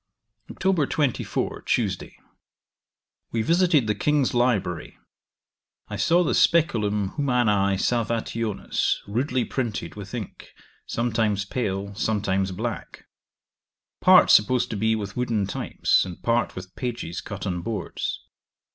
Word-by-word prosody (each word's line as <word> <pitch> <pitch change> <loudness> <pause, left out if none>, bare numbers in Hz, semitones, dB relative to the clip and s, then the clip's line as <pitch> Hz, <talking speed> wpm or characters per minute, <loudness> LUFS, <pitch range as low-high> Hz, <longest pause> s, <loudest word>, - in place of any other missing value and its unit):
'Oct. 185 -7 0
24, 145 -6 -1
Tuesday. - - -1 1.1
We 115 -1 0
visited 170 -3 +3
the 105 - +1
King's 145 +5 +1
library 110 -9 0 0.9
I - - -4
saw 175 +2 +3
the 160 - 0
Speculum 105 - +2
humanae 105 -8 +2
Salvationis, 115 -1 -1
rudely 125 +4 0
printed, 120 -4 -3
with 105 +3 -8
ink, 110 -6 -8 0.3
sometimes 110 -4 0
pale, 100 -3 -3
sometimes 100 -2 0
black; 110 +5 -5 0.9
part - - +7
supposed 120 +4 +4
to - - -2
be 110 +2 +1
with 100 -2 -5
wooden 115 -5 0
types, 100 - +1
and 90 -2 -8
part 120 +1 +1
with 95 0 -9
pages 120 -9 -4
cut 105 -1 -7
on 90 -3 -2
boards. 110 +2 -4
110 Hz, 115 wpm, -25 LUFS, 100-125 Hz, 1.1 s, part